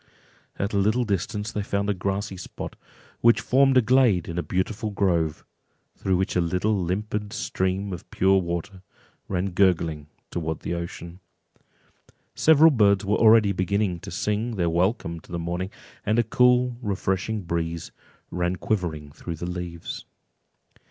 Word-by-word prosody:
At 100 +2 -2
a 100 - +2
little 110 +5 +2
distance 105 +1 -2
they 105 - -2
found 100 0 -1
a 105 - +2
grassy 100 +2 -3
spot, 90 - -7 0.4
which 115 0 +5
formed 135 0 +4
a 125 - +5
glade 115 -7 +3
in 85 0 -3
a - - +1
beautiful 100 +5 -2
grove, 85 -6 0 0.5
through 95 -2 0
which 95 - -1
a 90 - +3
little 90 +6 +1
limpid 105 +3 -2
stream 95 +1 -2
of 90 +1 -9
pure 95 +1 +3
water 85 +2 -4 0.5
ran 95 0 -1
gurgling 85 -5 +1 0.2
towards 80 -2 -3
the - - -3
ocean. 85 +1 -6 1.1
Several 160 +1 +6
birds 100 -6 +3
were 105 +2 +2
already 110 -2 +6
beginning 95 -1 0
to - - -9
sing 105 +6 -1
their 85 -4 0
welcome 85 -1 0
to - - -18
the 85 - -2
morning, 85 +2 -3 0.3
and 110 +2 +1
a 120 - +4
cool 125 +1 +3
refreshing 100 0 -1
breeze 85 -1 -3 0.4
ran 90 0 0
quivering 85 -7 -2
through 85 +3 -6
the 85 - -6
leaves. 90 -2 -6
95 Hz, 150 wpm, -25 LUFS, 85-105 Hz, 1.1 s, Several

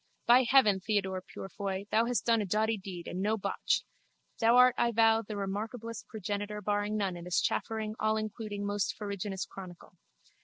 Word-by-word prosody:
By 245 +2 +6
heaven, 215 -8 +5
Theodore 190 -2 -1
Purefoy, 195 +1 -5
thou 225 +1 +3
hast 245 -1 0
done 230 -2 +3
a - - -2
doughty 220 +3 +1
deed 185 -4 -8
and 185 - -4
no 215 +2 +1
botch! - - 0 0.6
Thou 230 +1 +5
art, 250 0 +7
I 235 - +2
vow, 225 0 +4
the 215 -1 -7
remarkablest 215 +3 -4
progenitor 210 0 -4
barring 205 +1 -1
none 195 -3 -1
in 175 0 -8
this 180 -1 +1
chaffering 220 -1 -1
allincluding 215 -1 -2
most 205 0 -1
farraginous 200 -2 -4
chronicle. 180 -2 -11
210 Hz, 165 wpm, -31 LUFS, 195-225 Hz, 0.6 s, art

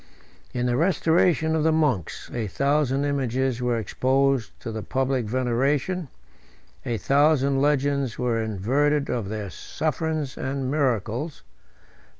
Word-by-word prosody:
In 125 0 -2
the 120 0 +1
restoration 160 -1 +2
of 160 - +1
the 160 +1 +3
monks, 145 - 0
a 115 -3 -2
thousand 140 +3 +1
images 130 -3 0
were 120 -1 +1
exposed 130 +1 0
to 115 - -5
the 110 0 -4
public 130 0 -1
veneration; 135 - 0 0.8
a 115 - -2
thousand 140 0 +3
legends 140 -3 +1
were 120 -2 0
inverted 135 +8 +1
of 115 -5 -2
their 105 -3 -4
sufferings 155 - -3
and 135 -1 -2
miracles. 130 - -1
135 Hz, 125 wpm, -25 LUFS, 120-145 Hz, 0.8 s, the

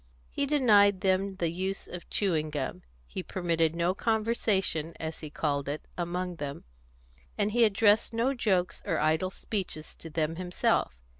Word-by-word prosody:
He 280 - -1
denied 210 -9 +5
them 190 +1 +1
the 170 -3 -1
use 190 +3 -3
of 175 -1 -9
chewing 160 -7 +1
gum; 135 -10 -3 0.2
he 185 - -5
permitted 165 -3 0
no 170 +2 +1
conversation, 210 -7 0
as 160 0 -5
he 155 - -7
called 140 -2 -1
it, 150 +2 -5
among 180 0 -3
them; 145 -2 -5 0.7
and 205 +1 +1
he 235 +1 +5
addressed 210 +1 +4
no 235 +4 +1
jokes 195 -8 0
or - - 0
idle 160 +4 +2
speeches 185 -6 -4
to 165 - -11
them 160 +1 -1
himself. 180 - 0
180 Hz, 155 wpm, -29 LUFS, 160-205 Hz, 0.7 s, denied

